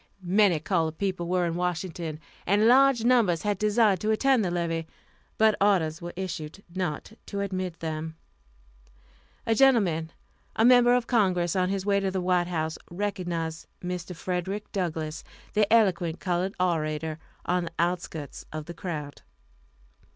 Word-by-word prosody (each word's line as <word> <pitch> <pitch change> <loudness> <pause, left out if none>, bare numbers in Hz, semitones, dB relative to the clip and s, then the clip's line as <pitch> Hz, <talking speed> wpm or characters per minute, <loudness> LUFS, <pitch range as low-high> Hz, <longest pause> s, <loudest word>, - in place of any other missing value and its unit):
Many 185 -2 +3
colored 160 -1 -1
people 185 -3 -2
were 180 0 +1
in 170 - -1
Washington, 170 -2 -3 0.3
and 205 +4 +4
large 260 -1 +5
numbers 230 -9 +3
had 205 -2 -1
desired 210 -2 +3
to 215 - -2
attend 250 +2 +3
the 185 - 0
levee, 165 -2 -2 0.5
but 220 0 +5
orders 175 -6 +2
were 175 0 -5
issued 175 -1 -5
not 180 -1 -3 0.2
to 200 -1 -3
admit 185 -3 -3
them. 160 0 -4 1.3
A 225 - +2
gentleman, 200 -11 +3 0.4
a 225 - +3
member 245 0 +6
of 250 -1 +1
Congress, 185 -8 +1
on 185 -1 +1
his 195 -1 -2
way 200 -1 +3
to 195 -1 0
the 190 0 -2
White 180 -1 +1
House, 160 -2 -2
recognized 175 -4 -3 0.2
Mr. 180 0 -4
Frederick 185 +4 -3
Douglass, 160 -5 -3 0.3
the 210 0 +2
eloquent 180 -7 +3
colored 185 +1 -1
orator, 155 -3 -1 0.3
on 180 0 0
the 165 - -6
outskirts 170 -4 -2
of 155 -1 -5
the 170 - -7
crowd. 155 -5 -6
180 Hz, 150 wpm, -27 LUFS, 165-205 Hz, 1.3 s, member